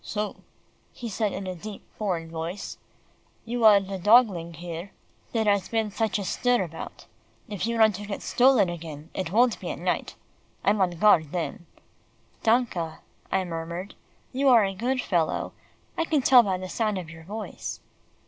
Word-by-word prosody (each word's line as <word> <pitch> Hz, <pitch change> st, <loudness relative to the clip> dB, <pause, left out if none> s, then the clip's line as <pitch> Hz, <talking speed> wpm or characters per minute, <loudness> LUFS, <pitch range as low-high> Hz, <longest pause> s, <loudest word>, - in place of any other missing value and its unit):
"So," 210 Hz, -1 st, -3 dB, 0.6 s
he 240 Hz, -, -6 dB
said 215 Hz, -1 st, -1 dB
in 195 Hz, -, -5 dB
a 185 Hz, -, -3 dB
deep 200 Hz, +4 st, -9 dB
foreign 175 Hz, -6 st, -2 dB
voice, 165 Hz, +4 st, -5 dB, 0.7 s
"you 235 Hz, 0 st, -2 dB
are 210 Hz, -2 st, +9 dB
the 195 Hz, 0 st, -5 dB
dogling 200 Hz, -5 st, +4 dB, 0.8 s
there 225 Hz, -2 st, +1 dB
has 200 Hz, -2 st, +2 dB
been 220 Hz, -2 st, 0 dB
such 220 Hz, +1 st, 0 dB
a 200 Hz, -, -3 dB
stir 245 Hz, +2 st, +1 dB
about. 165 Hz, -2 st, -8 dB, 0.4 s
If 210 Hz, +1 st, -3 dB
you 235 Hz, 0 st, -1 dB
want 220 Hz, -4 st, +5 dB
to 205 Hz, 0 st, -8 dB
get 200 Hz, -, -5 dB
stolen 250 Hz, -5 st, +4 dB
again, 165 Hz, -2 st, -7 dB
it 185 Hz, -3 st, -3 dB
won't 235 Hz, +2 st, +3 dB
be -, -, -5 dB
at -, -, -4 dB
night. -, -, -2 dB, 0.5 s
I'm 205 Hz, 0 st, +3 dB
on 175 Hz, -2 st, +1 dB
guard 160 Hz, -6 st, +4 dB
then." 170 Hz, -1 st, -4 dB, 0.7 s
"Danke," 220 Hz, -9 st, +1 dB, 0.3 s
I 190 Hz, -, +2 dB
murmured, 170 Hz, +3 st, -5 dB, 0.4 s
"you 270 Hz, +2 st, +3 dB
are 230 Hz, -5 st, +7 dB
a 195 Hz, -, -2 dB
good 250 Hz, +6 st, -1 dB
fellow; 170 Hz, -4 st, 0 dB, 0.4 s
I 330 Hz, -, 0 dB
can 300 Hz, -5 st, +1 dB
tell 250 Hz, -1 st, +8 dB
by 195 Hz, -5 st, -1 dB
the 185 Hz, 0 st, -6 dB
sound 215 Hz, +1 st, -1 dB
of 170 Hz, -3 st, -6 dB
your 165 Hz, 0 st, -12 dB
voice." 210 Hz, +5 st, -6 dB
200 Hz, 170 wpm, -26 LUFS, 175-225 Hz, 0.8 s, are